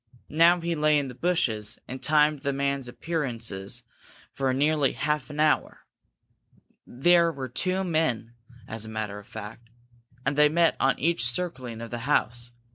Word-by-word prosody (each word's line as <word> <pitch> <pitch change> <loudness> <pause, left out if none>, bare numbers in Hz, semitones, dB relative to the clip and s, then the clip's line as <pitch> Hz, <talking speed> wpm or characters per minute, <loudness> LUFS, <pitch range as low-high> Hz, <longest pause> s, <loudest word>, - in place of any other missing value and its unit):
Now 170 +3 +5
he 170 0 -1
lay 150 -1 +3
in 140 -2 -1
the - - -8
bushes 120 -8 0
and 130 +1 -7
timed 150 -1 +3
the 140 -1 -1
man's 140 -1 -1
appearances 120 - -2 0.5
for 135 -1 0
nearly 145 +1 +2
half 150 -2 -1
an 150 0 -7
hour. 155 0 +1 1.0
There 170 +6 +4
were 135 -4 -5
two 185 +9 0
men, 155 -10 -1 0.3
as 110 -1 -5
a 110 - -3
matter 110 -2 -4
of 105 - -15
fact, 110 +2 -9 0.6
and 135 +2 +1
they 150 0 +5
met 165 +1 +3
on 135 - +2
each 165 -5 +2
circling 125 -5 -4
of 115 - -7
the 120 - -3
house. 120 -4 +1
140 Hz, 160 wpm, -26 LUFS, 120-155 Hz, 1.0 s, Now